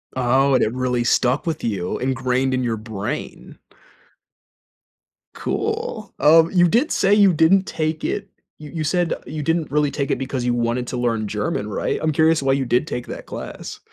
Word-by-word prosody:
Oh, 130 Hz, +2 st, +3 dB
and -, -, +3 dB
it 110 Hz, -, 0 dB
really 125 Hz, -1 st, 0 dB
stuck 125 Hz, +4 st, +1 dB
with 160 Hz, -1 st, -3 dB
you 95 Hz, -6 st, -2 dB
ingrained 130 Hz, 0 st, 0 dB
in 130 Hz, -, -1 dB
your 115 Hz, -2 st, -1 dB
brain. 105 Hz, -2 st, -6 dB, 1.7 s
Cool, -, -, -3 dB
um, 165 Hz, +2 st, +6 dB
you 175 Hz, -2 st, +4 dB
did 250 Hz, -, +2 dB
say 195 Hz, +1 st, +3 dB
you 200 Hz, -3 st, +6 dB
didn't 185 Hz, +5 st, +4 dB
take 155 Hz, -1 st, -3 dB
it 200 Hz, -1 st, -3 dB, 0.3 s
you 150 Hz, -1 st, -10 dB
you 160 Hz, -2 st, -3 dB
said 175 Hz, +1 st, +1 dB
you 150 Hz, -1 st, -4 dB
didn't 165 Hz, 0 st, 0 dB
really 150 Hz, -1 st, +1 dB
take 140 Hz, -2 st, -2 dB
it -, -, +1 dB
because 130 Hz, -1 st, -3 dB
you 120 Hz, 0 st, +1 dB
wanted 120 Hz, +1 st, -1 dB
to 125 Hz, -, -4 dB
learn 115 Hz, -3 st, -1 dB
German, 105 Hz, 0 st, -2 dB
right? 100 Hz, -, -2 dB
I'm 155 Hz, 0 st, +1 dB
curious 160 Hz, +1 st, +3 dB
why 135 Hz, 0 st, +2 dB
you 135 Hz, -1 st, 0 dB
did 125 Hz, +5 st, +1 dB
take 125 Hz, -, -4 dB
that -, -, -7 dB
class. -, -, -7 dB
135 Hz, 185 wpm, -21 LUFS, 120-160 Hz, 1.7 s, um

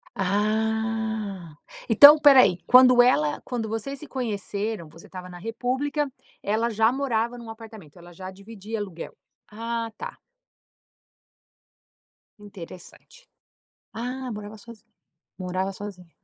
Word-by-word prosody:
Ah, 215 Hz, -2 st, -2 dB, 0.3 s
então 285 Hz, +6 st, +10 dB
espera 285 Hz, -3 st, +7 dB
aí, 185 Hz, -6 st, +2 dB
quando 250 Hz, -1 st, +7 dB
ela 150 Hz, -12 st, +2 dB
quando 235 Hz, -3 st, -4 dB
vocês 225 Hz, +6 st, -4 dB
se 305 Hz, -, -10 dB
conheceram, 215 Hz, -6 st, -4 dB
você 165 Hz, +2 st, -16 dB
estava 185 Hz, -1 st, -9 dB
na 180 Hz, -1 st, -11 dB
república, 260 Hz, -, -2 dB, 0.4 s
ela 220 Hz, +3 st, 0 dB
já 225 Hz, +1 st, +2 dB
morava 245 Hz, -3 st, -1 dB
em 240 Hz, -, -10 dB
um 230 Hz, -, -10 dB
apartamento, 220 Hz, -8 st, -12 dB
ela 175 Hz, 0 st, -14 dB
já 185 Hz, +2 st, -8 dB
dividia 205 Hz, +3 st, -8 dB
aluguel? 190 Hz, -5 st, -7 dB, 0.3 s
Ah 230 Hz, +1 st, -4 dB
tá. -, -, -8 dB, 2.2 s
Interessante. 205 Hz, -, -13 dB, 0.7 s
Ah, 250 Hz, +2 st, -5 dB
morava 210 Hz, 0 st, -8 dB
sozinha, 225 Hz, 0 st, -15 dB, 0.5 s
morava 185 Hz, +1 st, -3 dB
sozinha. 190 Hz, -3 st, -10 dB
220 Hz, 120 wpm, -25 LUFS, 195-235 Hz, 2.2 s, então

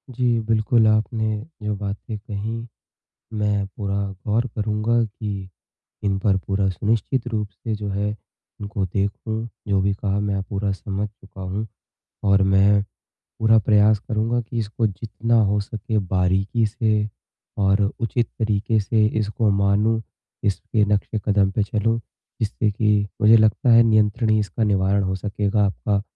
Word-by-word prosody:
जी। 120 Hz, -2 st, +2 dB
बिल्कुल, 110 Hz, +1 st, +2 dB
आपने 110 Hz, +1 st, +1 dB, 0.3 s
जो 105 Hz, 0 st, -1 dB
बातें 105 Hz, +2 st, -5 dB
कहीं 110 Hz, +2 st, -5 dB, 0.7 s
मैं 105 Hz, -1 st, +1 dB
पूरा 100 Hz, -1 st, -2 dB, 0.3 s
गौर 115 Hz, +4 st, +1 dB
करूँगा 110 Hz, +2 st, 0 dB
कि 105 Hz, -1 st, -6 dB, 0.7 s
इन 100 Hz, -2 st, +1 dB
पर 95 Hz, -1 st, +2 dB
पूरा 100 Hz, 0 st, 0 dB
सुनिश्चित 115 Hz, +6 st, -1 dB
रूप 105 Hz, -4 st, -2 dB
से 110 Hz, +3 st, -5 dB
जो 105 Hz, -, -3 dB
है 100 Hz, +1 st, -1 dB, 0.5 s
इनको 100 Hz, -1 st, -2 dB
देखूँ, 105 Hz, +4 st, -2 dB, 0.2 s
जो 100 Hz, -2 st, +2 dB
भी 100 Hz, +1 st, +1 dB
कहा 100 Hz, 0 st, -1 dB
मैं 100 Hz, -1 st, -1 dB
पूरा 100 Hz, +1 st, -2 dB
समझ 100 Hz, +1 st, -3 dB
चुका 95 Hz, -2 st, -14 dB
हूँ। 95 Hz, +4 st, -3 dB, 0.6 s
और 100 Hz, 0 st, +4 dB
मैं 100 Hz, +1 st, +5 dB, 0.6 s
पूरा 110 Hz, 0 st, +5 dB
प्रयास 105 Hz, 0 st, +4 dB
करूँगा 115 Hz, +2 st, 0 dB
कि 115 Hz, 0 st, -5 dB
इसको 110 Hz, +1 st, -1 dB
जितना 115 Hz, +3 st, 0 dB
हो 105 Hz, 0 st, +2 dB
सके 110 Hz, +2 st, -3 dB
बारीकी 95 Hz, +4 st, +1 dB
से 110 Hz, -1 st, 0 dB, 0.5 s
और 100 Hz, +1 st, +3 dB, 0.2 s
उचित 115 Hz, 0 st, 0 dB
तरीके 110 Hz, 0 st, +1 dB
से 105 Hz, +1 st, +2 dB
इसको 110 Hz, 0 st, 0 dB
मानूँ, 100 Hz, +3 st, +2 dB, 0.4 s
इसके 105 Hz, +1 st, +1 dB
नक्शे 105 Hz, +1 st, 0 dB
कदम 100 Hz, -2 st, +3 dB
पे 100 Hz, +2 st, 0 dB
चलूँ 115 Hz, +2 st, 0 dB, 0.4 s
जिससे 110 Hz, 0 st, 0 dB
कि 105 Hz, 0 st, +1 dB
मुझे 110 Hz, +1 st, +7 dB
लगता 110 Hz, +3 st, +3 dB
है 115 Hz, 0 st, +8 dB
नियंत्रण 110 Hz, +1 st, +2 dB
ही 110 Hz, -, +4 dB
इसका 105 Hz, +2 st, -1 dB
निवारण 100 Hz, -1 st, +2 dB
हो 95 Hz, 0 st, -1 dB
सकेगा। 105 Hz, +1 st, 0 dB
आपका 100 Hz, +1 st, -1 dB
105 Hz, 145 wpm, -22 LUFS, 100-110 Hz, 0.7 s, है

